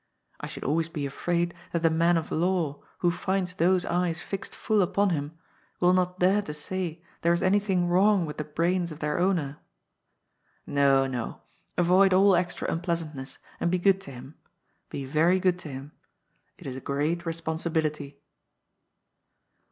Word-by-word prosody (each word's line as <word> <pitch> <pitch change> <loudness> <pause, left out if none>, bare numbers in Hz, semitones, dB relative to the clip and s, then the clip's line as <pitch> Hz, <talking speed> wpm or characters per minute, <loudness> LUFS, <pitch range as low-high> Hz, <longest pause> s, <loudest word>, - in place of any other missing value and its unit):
I - - -5
should - - -8
always 160 +3 0
be 150 -3 -3
afraid 170 +5 -1 0.2
that 170 -1 -1
the 165 - +4
man 170 +2 +3
of 160 - -4
law 170 -4 0 0.2
who 175 - +5
finds 185 +1 -1
those 180 +1 +2
eyes 175 -1 -1
fixed 195 0 -6
full 215 -2 +1
upon 195 +2 +2
him 150 0 -3 0.4
will 180 0 +4
not 180 0 +1
dare 190 +3 +3
to 150 -7 -6
say 175 +1 -4 0.2
there 170 +1 +3
is 170 - 0
anything 190 -2 +2
wrong 190 +1 +4
with 150 - -7
the 150 - -2
brains 170 +3 0
of 155 - -7
their 150 +1 -1
owner. 170 -6 0 1.1
No, 140 -1 +3
no. 125 -4 -4 0.3
Avoid 185 +2 +5
all 195 0 +6
extra 180 +1 -1
unpleasantness, 165 -5 -3 0.2
and 170 - +1
be 180 - +2
good 195 +1 +3
to 195 - -10
him; 130 +3 -10 0.6
be 140 - -5
very 165 +7 +3
good 180 -1 +1
to 160 - -8
him. 135 +2 -8 0.7
It - - -14
is 130 -2 -5
a 130 - -7
great 145 +6 -1
respon 165 -1 -3
sibility." 155 -4 -2
170 Hz, 165 wpm, -27 LUFS, 150-185 Hz, 1.1 s, all